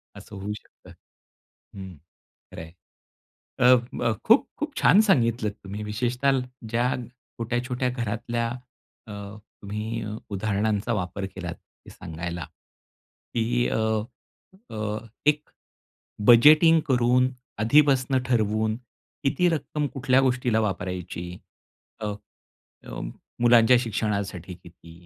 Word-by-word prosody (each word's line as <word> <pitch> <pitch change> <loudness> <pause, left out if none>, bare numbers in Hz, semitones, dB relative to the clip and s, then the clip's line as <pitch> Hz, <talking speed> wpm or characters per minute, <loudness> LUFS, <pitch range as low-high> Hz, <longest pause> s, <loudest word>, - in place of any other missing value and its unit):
असं 105 - -11
होऊ 100 +2 -4
शकतं - - -19 0.8
हं, 95 -2 -8 0.6
खरे - - -8
आहे. 80 0 -11 0.9
अ, 125 +1 +7 0.2
ब 120 -2 0
खूप-खूप 280 +6 +2
छान 155 +9 +6
सांगितलत 115 - +2
तुम्ही. 100 +2 -6
विशेषतः 125 +5 0 0.3
ज्या, 120 +3 +1 0.5
छोट्या-छोट्या 125 +2 -1
घरातल्या, 115 -1 -2 0.6
अ, 105 - -8 0.5
तुम्ही 105 +3 -4
अ, 105 0 -5
उदाहरणांचा 105 +2 -1
वापर 95 -1 -3
केलात, 90 -3 -5
हे - - -21
सांगायला, 85 -1 -6 0.9
की 120 +1 +1
अ, - - 0 0.9
अ, 105 -1 -3 0.3
एक, 150 0 +4 0.9
बजेटिंग 155 +7 +8
करून, 125 0 +3 0.3
आधीपासनं 135 +2 +4
ठरवून, 110 -2 +1 0.5
किती 140 +6 +2
रक्कम 150 -1 -2
कुठल्या 135 -1 +3
गोष्टीला 125 -3 +1
वापरायची? 90 -4 -3 0.7
अ, 110 - -3 0.8
अ, - - -7 0.4
मुलांच्या 120 0 +6
शिक्षणासाठी 100 -6 -3
किती? 85 -1 -16
115 Hz, 100 wpm, -25 LUFS, 100-125 Hz, 0.9 s, बजेटिंग